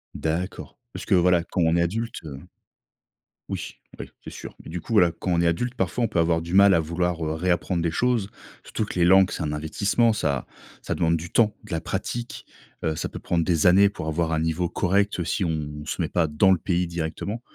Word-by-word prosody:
D'accord, 85 +4 -3 0.2
parce - - -7
que 100 - +3
voilà, 90 -1 +4
quand 90 - -2
on 80 0 +3
est 85 - +3
adulte, 110 +7 -3
heu 70 -4 -8 1.1
Oui, - - -5 0.2
oui, - - -8 0.2
c'est - - -6
sûr. - - -9
Mais - - -10
du 85 +2 -5
coup - - -11
voilà, 90 -6 +5
quand 90 - -2
on 85 - +2
est 85 - +3
adulte, 120 +9 -1
parfois, 95 +3 -1
on - - +3
peut 85 - 0
avoir 80 0 +2
du 85 +2 -7
mal 100 0 +7
à 85 - +3
vouloir, 85 +1 -2
heu, 75 - -1
réapprendre 85 +1 0
des 85 0 0
choses. 120 -1 0 0.3
Surtout - - -3
que 95 - -5
les 85 - +5
langues, 95 +1 +5
c'est - - -4
un 75 -1 -2
investissement, 100 +9 +1
ça 70 -11 -1 0.4
ça - - -3
demande 85 0 +2
du 85 +1 -5
temps, 110 -3 +3
de 105 - -13
la 80 - 0
pratique. 120 +8 -5 0.4
Heu, 80 - 0
ça - - -2
peut - - -8
prendre 85 -2 0
des 80 -3 +1
années 95 +3 +7
pour 90 -5 -7
avoir 80 +1 0
un 80 - +1
niveau 80 +2 0
correct 100 +1 0
si 95 +3 -1
on 75 -2 -4
se 75 - -3
met 80 - -1
pas 85 -2 +1
dans 75 +6 +3
le 95 - +4
pays 90 +1 -1
directement. 85 +6 -4
85 Hz, 235 wpm, -24 LUFS, 80-95 Hz, 1.1 s, mal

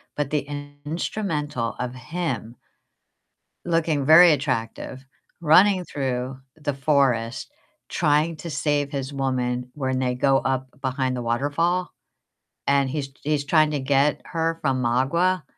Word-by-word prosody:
but 145 -2 -1
the 145 -2 -1 0.4
instrumental 150 - -2
of 125 0 -3
him 130 -4 -4 1.1
looking 160 -4 +1
very 165 +2 +8
attractive, 130 -1 -2 0.4
running 180 +4 +5
through 130 -3 -3 0.2
the 145 -2 -3
forest, 135 - +1 0.4
trying 155 +1 +2
to 170 - -7
save 145 -1 0
his 135 -1 -4
woman 125 -2 -1
when 130 -3 -2
they 125 -1 0
go 135 +1 +3
up 130 -1 -1
behind 130 -1 -1
the 125 - -3
waterfall, 145 +10 0 0.8
and 140 -1 +3
he's 135 -1 -3
he's 150 -1 0
trying 155 +1 +3
to 145 - -1
get 140 +2 +2
her 165 -1 -1
from 130 -3 0
Magua, 150 +9 +1
140 Hz, 125 wpm, -24 LUFS, 130-155 Hz, 1.1 s, very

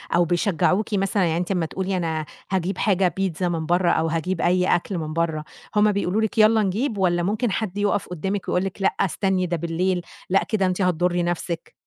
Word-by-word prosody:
أو 175 - +4
بيشجعوكِ 185 +4 +1
مثلًا؟ 195 0 +1
يعني 165 0 0
أنتِ 180 +2 -2
أما 175 -4 +1
تقولي 190 +3 -2
أنا 160 -3 -2 0.3
هاجيب 190 0 -1
حاجة 195 -3 +2
بيتزا 185 -2 -1
من 160 -2 -2
برّا، 175 +1 +2
أو 165 - +1
هاجيب 165 +2 -1
أي 180 +1 +3
أكل 180 +2 -3
من 155 -1 -4
برّا، 165 -2 -1 0.3
هُم 210 0 +5
بيقولوا 200 +1 0
لِك 220 - -2
يالّا 220 0 +5
نجيب، 215 +5 -1
والّا 175 -2 +2
ممكن 215 +4 0
حد 205 -1 -3
يقف 205 -1 0
قدامِك 190 +3 -3
ويقول 180 - +1
لِك 195 +1 -5
لأ - - +2
استني، 190 -1 +1
ده 175 -1 -1
بالليل 175 +2 -1 0.3
لأ، 195 +1 +3
كده 200 -4 0
أنتِ 185 +1 0
هتضري 180 0 +1
نفسِك؟ 170 -1 -3
185 Hz, 200 wpm, -23 LUFS, 170-195 Hz, 0.3 s, هُم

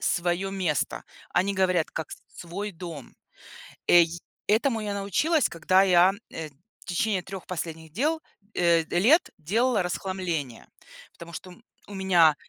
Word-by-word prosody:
свое 175 +1 0
место. 185 -7 -1 0.3
Они 190 +3 +1
говорят, 185 -3 +2
как 160 - -5
с - - -8 0.2
свой 195 +5 -5
дом. 165 -6 -9 0.7
Эй 170 -1 +7 0.4
этому 225 +2 +2
я 210 -1 -3
научилась, 240 - +1
когда 185 +3 +3
я, 185 0 +5 0.2
э, 160 -1 -6 0.3
в - - -18
течение 190 +2 0
3 190 +1 -8
последних 160 -3 -6
дел, 310 - 0 0.3
э, 170 -2 +4
лет 240 - +3
делала 215 +7 +1
расхламление. 175 -8 -3 0.4
Потому 170 0 -11
что 185 - -8
у - - -11
м 225 - -22 0.3
у 205 - -9
меня 175 -5 +5
185 Hz, 145 wpm, -26 LUFS, 170-200 Hz, 0.7 s, Эй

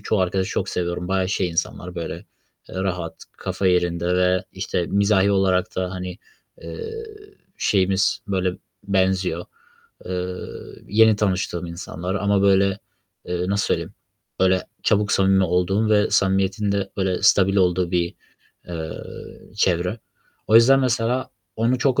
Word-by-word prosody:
çoğu 110 - 0
arkadaşı 95 +1 0
çok - - -2
seviyorum. 90 0 -3
Bayağı 95 -1 +1
şey 95 -2 0
insanlar, 90 +1 -3
böyle, 85 -2 -4 0.5
eee, - - -11
rahat, 95 -1 -3
kafa 100 - -2
yerinde 90 -1 +1
ve, 90 0 +2
işte, 85 - -2
mizahi 100 0 +3
olarak 95 -1 +1
da, 95 -1 -1
hani, 90 -1 -6 0.4
eee, 455 0 -6 0.5
şeyimiz, 95 0 +2
böyle, 95 -2 0 0.4
benziyor. 95 -1 +1 0.6
Eee, 90 0 -3 0.5
yeni 110 +1 +5
tanıştığım 95 -4 -1
insanlar 85 +2 -5
ama, 100 0 +1
böyle, 100 0 +3 0.5
eee, 90 0 -2
nasıl 100 +1 +1
söyleyeyim, - - -2 0.5
böyle, 95 0 +3 0.2
çabuk 105 -1 +2
samimi 95 0 +4
olduğum 90 +5 +1
ve 105 -1 +3
samimiyetin 95 +2 +1
de 100 -1 -1
böyle 95 -2 -1
stabil 100 -2 +4
olduğu 90 -2 +2
bir, 85 -1 0 0.5
eee, 80 -2 -5 0.5
çevre. 90 +2 +1 0.5
O 110 - +1
yüzden 130 +4 +7
mesela 125 0 0 0.3
onu 120 +3 +1
çok 130 -1 +2
95 Hz, 135 wpm, -22 LUFS, 90-100 Hz, 0.6 s, yüzden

